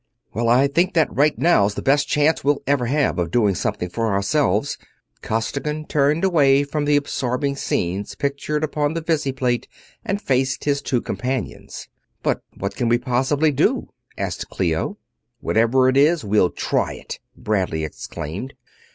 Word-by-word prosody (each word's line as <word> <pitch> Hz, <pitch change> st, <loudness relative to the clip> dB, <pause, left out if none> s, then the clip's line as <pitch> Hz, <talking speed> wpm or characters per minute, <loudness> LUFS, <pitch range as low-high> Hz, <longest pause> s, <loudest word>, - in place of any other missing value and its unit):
"Well, 115 Hz, +1 st, 0 dB
I 125 Hz, +3 st, +5 dB
think 170 Hz, +6 st, +1 dB
that 160 Hz, -2 st, +2 dB
right 145 Hz, +2 st, +3 dB
now's 105 Hz, -12 st, +3 dB
the -, -, -5 dB
best 145 Hz, +1 st, +3 dB
chance 150 Hz, 0 st, +2 dB
we'll 145 Hz, +1 st, +1 dB
ever 135 Hz, -3 st, +1 dB
have 140 Hz, -6 st, +1 dB
of 85 Hz, -1 st, -1 dB
doing 105 Hz, 0 st, +2 dB
something 90 Hz, 0 st, -2 dB
for 115 Hz, +4 st, -2 dB
ourselves." 105 Hz, +4 st, +1 dB, 0.4 s
Costigan 145 Hz, +7 st, -2 dB
turned 150 Hz, +3 st, +1 dB
away 145 Hz, -7 st, +4 dB
from 145 Hz, +1 st, -2 dB
the 145 Hz, 0 st, +3 dB
absorbing 140 Hz, -1 st, -1 dB
scenes 95 Hz, -5 st, -2 dB
pictured 140 Hz, +2 st, -2 dB
upon 150 Hz, 0 st, -1 dB
the 165 Hz, -, -1 dB
visiplate 135 Hz, -6 st, 0 dB, 0.4 s
and 200 Hz, +1 st, -2 dB
faced 130 Hz, -5 st, 0 dB
his 140 Hz, -1 st, 0 dB
two 125 Hz, -4 st, 0 dB
companions. 125 Hz, -1 st, -4 dB, 0.4 s
"But -, -, 0 dB, 0.2 s
what 100 Hz, +1 st, -4 dB
can 120 Hz, -2 st, 0 dB
we 120 Hz, -, +4 dB
possibly 135 Hz, +5 st, +1 dB
do?" 135 Hz, -, +1 dB, 0.3 s
asked -, -, -4 dB
Clio. 80 Hz, -4 st, -1 dB, 0.4 s
"Whatever 120 Hz, +4 st, +3 dB
it 130 Hz, +1 st, +2 dB
is, 155 Hz, 0 st, +3 dB
we'll 100 Hz, -3 st, +3 dB
try -, -, -1 dB
it!" -, -, -8 dB, 0.2 s
Bradley 95 Hz, -7 st, -1 dB
exclaimed. 85 Hz, -, -6 dB
135 Hz, 155 wpm, -21 LUFS, 115-145 Hz, 0.4 s, I